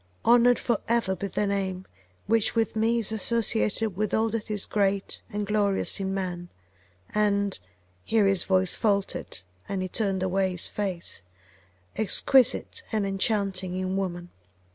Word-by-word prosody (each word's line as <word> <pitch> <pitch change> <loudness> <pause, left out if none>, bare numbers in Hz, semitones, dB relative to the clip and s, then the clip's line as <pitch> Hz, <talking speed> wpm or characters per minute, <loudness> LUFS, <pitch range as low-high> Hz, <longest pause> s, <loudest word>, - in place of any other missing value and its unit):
Honoured 240 +1 +5
for 235 -4 0
ever 230 -5 +1
be 200 - -4
the 205 - -1
name, 190 -2 -2 0.4
which 225 +2 +1
with 225 -1 0
me 225 +2 +2
is 220 -2 +1
associated 220 -1 0
with 210 +1 -1
all 225 +1 +2
that 220 -1 -4
is 210 -2 -1
great 200 -1 -1
and 205 0 -2
glorious 205 -1 0
in 190 -1 -2
man, 180 -2 -4 0.6
and 200 -2 +1 0.4
[here 220 -2 +2
his 195 -2 +3
voice 185 -1 +2
faltered, 200 - -1 0.3
and 190 -2 -2
he - - -2
turned 195 -1 -1
away 190 +1 +1
his 180 - -1
face] 185 - -3 0.7
exquisite 220 +4 +3
and 215 -3 0
enchanting 195 -2 -1
in 185 0 -2
woman! 175 -2 -4
200 Hz, 145 wpm, -26 LUFS, 190-220 Hz, 0.7 s, Honoured